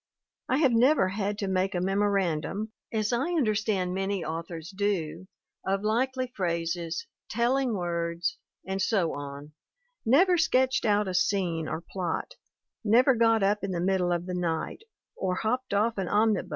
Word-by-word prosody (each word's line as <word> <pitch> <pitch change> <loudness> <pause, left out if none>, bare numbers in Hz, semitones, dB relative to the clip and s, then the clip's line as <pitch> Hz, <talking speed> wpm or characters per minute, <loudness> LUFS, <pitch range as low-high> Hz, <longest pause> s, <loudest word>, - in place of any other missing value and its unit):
I 260 - +3
have 280 -4 +4
never 240 -2 +4
had 205 +1 -2
to 200 - -2
make 190 +1 0
a - - +1
memorandum, 195 +1 0 0.2
as 215 0 0
I 275 +9 0
understand 215 - +1
many 195 -1 -1
authors 165 +2 -5
do, 190 -3 -1 0.4
of 195 +1 -1
likely 255 +3 0
phrases, 170 -2 -2 0.2
telling 240 +1 +1
words, 170 -1 -2 0.3
and 190 0 -2
so 190 -5 +1
on, 145 +1 -7 0.5
never 345 +9 +4
sketched 260 -4 +2
out 210 -1 +3
a 185 - -2
scene 175 -4 +1
or 160 - -3
plot, 175 -1 -3 0.5
never 245 +5 +5
got 225 -2 +3
up 205 +1 +1
in 195 - -2
the 180 -2 -2
middle 180 0 +1
of 175 0 -1
the 180 - -4
night, 170 - -2 0.3
or 185 -1 -1
hopped 250 +6 -1
off 210 +2 +1
an 190 - -1
omnibus 215 +2 +3
MARY 190 - -4
S. - - -16
195 Hz, 165 wpm, -28 LUFS, 175-225 Hz, 0.5 s, never